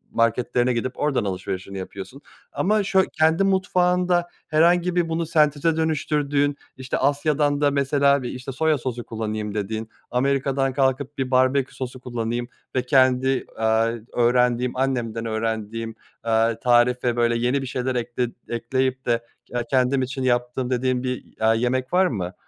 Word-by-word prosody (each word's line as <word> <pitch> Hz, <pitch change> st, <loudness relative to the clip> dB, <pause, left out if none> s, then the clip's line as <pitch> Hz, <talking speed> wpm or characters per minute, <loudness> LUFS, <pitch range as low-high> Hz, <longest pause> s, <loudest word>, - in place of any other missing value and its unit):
marketlerine 120 Hz, +2 st, +2 dB
gidip 120 Hz, +2 st, -3 dB
oradan 140 Hz, -7 st, +1 dB
alışverişini 95 Hz, 0 st, -4 dB
yapıyorsun 100 Hz, +8 st, -8 dB, 0.3 s
ama 210 Hz, +2 st, +1 dB
şöy 190 Hz, -1 st, +3 dB
Kendi 160 Hz, +4 st, +4 dB
mutfağında 180 Hz, -2 st, +2 dB, 0.2 s
herhangi 170 Hz, +3 st, +3 dB
bir 175 Hz, -2 st, +1 dB
bunu 165 Hz, +1 st, -1 dB
senteze 155 Hz, 0 st, +2 dB
dönüştürdüğün, 145 Hz, -2 st, 0 dB, 0.2 s
işte 130 Hz, -1 st, -3 dB
Asya'dan 145 Hz, +1 st, +1 dB
da 145 Hz, -1 st, +3 dB
mesela 140 Hz, 0 st, +3 dB
işte 125 Hz, +2 st, -5 dB
bir -, -, -11 dB
soya 160 Hz, 0 st, +2 dB
sosu 125 Hz, -2 st, -4 dB
kullanayım 110 Hz, -2 st, -4 dB
dediğin, 110 Hz, +2 st, -3 dB, 0.2 s
Amerika'dan 135 Hz, +1 st, +1 dB
kalkıp 135 Hz, +1 st, 0 dB
bir 130 Hz, -1 st, -2 dB
barbekü 130 Hz, +1 st, +2 dB
sosu 130 Hz, -1 st, -6 dB
kullanayım 120 Hz, -1 st, -3 dB, 0.3 s
ve 130 Hz, -, +2 dB
kendi, 130 Hz, 0 st, +3 dB
aaa, 110 Hz, +1 st, +2 dB, 0.2 s
öğrendiğim 125 Hz, 0 st, +2 dB
annemden 120 Hz, -4 st, -1 dB
öğrendiğim, 115 Hz, 0 st, -3 dB, 0.3 s
eee, 115 Hz, 0 st, +2 dB
tarife 120 Hz, 0 st, +3 dB
böyle 120 Hz, -1 st, +2 dB
yeni 125 Hz, +4 st, +1 dB
bir 135 Hz, -, -5 dB
şeyler 125 Hz, 0 st, -2 dB
ekle 120 Hz, +1 st, -1 dB, 0.2 s
ekleyip 130 Hz, +2 st, -1 dB
de 115 Hz, -1 st, +1 dB, 0.2 s
ke 120 Hz, -1 st, -3 dB
kendim 130 Hz, 0 st, +2 dB
için 130 Hz, +1 st, -3 dB
yaptığım 125 Hz, 0 st, 0 dB
dediğin 130 Hz, 0 st, 0 dB
bir, 125 Hz, -1 st, -3 dB, 0.2 s
aaa, 110 Hz, 0 st, +4 dB
yemek 125 Hz, +4 st, -1 dB
var 185 Hz, +1 st, +5 dB
mı, 95 Hz, -, -3 dB
130 Hz, 145 wpm, -23 LUFS, 120-140 Hz, 0.3 s, var